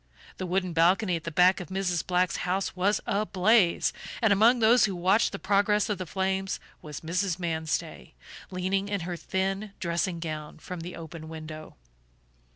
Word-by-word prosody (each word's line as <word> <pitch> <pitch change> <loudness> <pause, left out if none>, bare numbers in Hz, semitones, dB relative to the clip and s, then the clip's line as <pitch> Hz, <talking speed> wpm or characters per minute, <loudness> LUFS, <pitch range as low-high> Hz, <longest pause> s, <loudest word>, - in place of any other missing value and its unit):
The 185 - -4
wooden 185 0 -1
balcony 180 +3 +3
at 165 - -6
the 165 - -3
back 180 +4 +4
of 180 - -7
Mrs. 185 -3 -1
Black's 180 0 +1
house 185 +2 -2
was 195 +3 +1
ablaze, 200 -1 +2 0.3
and 225 -4 +4
among 225 +5 +5
those 235 +1 +5
who 195 -3 -3
watched 185 +6 +3
the 195 - -5
progress 205 +2 +2
of 205 -3 -1
the 185 - -5
flames 190 +1 -1 0.2
was 150 -2 -8
Mrs. 180 +2 -1
Manstey, 160 - -3 0.3
leaning 190 +2 -1
in 200 -2 -1
her 175 +1 -4
thin 195 +3 -2
dressing 170 0 -1
gown 155 -2 -6
from 180 +2 -7
the 175 +2 -7
open 160 -1 -9
window. 155 -1 -8
185 Hz, 165 wpm, -27 LUFS, 170-195 Hz, 0.3 s, among